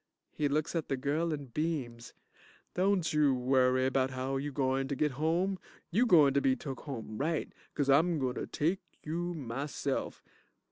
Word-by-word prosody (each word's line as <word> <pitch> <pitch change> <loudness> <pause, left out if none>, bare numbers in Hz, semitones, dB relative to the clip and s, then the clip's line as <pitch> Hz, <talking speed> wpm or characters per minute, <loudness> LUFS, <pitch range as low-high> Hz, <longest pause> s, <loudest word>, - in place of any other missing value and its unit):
(He 150 - 0
looks 150 +2 0
at 165 - -1
the 135 - 0
girl 150 +5 0
and 140 -6 -5
beams.) 130 -8 -3 0.6
Don't 185 -2 +1
you 150 -3 +4
worry 130 0 +3
bout 130 0 +2
how 130 +1 -2
you 145 +2 -3
gointer 135 0 0
git 150 +2 +1
home. 170 +7 0 0.3
You 235 +8 +3
gointer 145 - +6
be 130 -1 +3
took 135 +1 -6
home 115 -6 -6
right, 160 +2 -1 0.2
'cause 145 -2 0
I'm 160 +5 +4
gointer 130 -3 -2
take 170 +6 +1 0.2
you 175 +3 -3
myself. 140 +1 -3
140 Hz, 155 wpm, -31 LUFS, 130-160 Hz, 0.6 s, gointer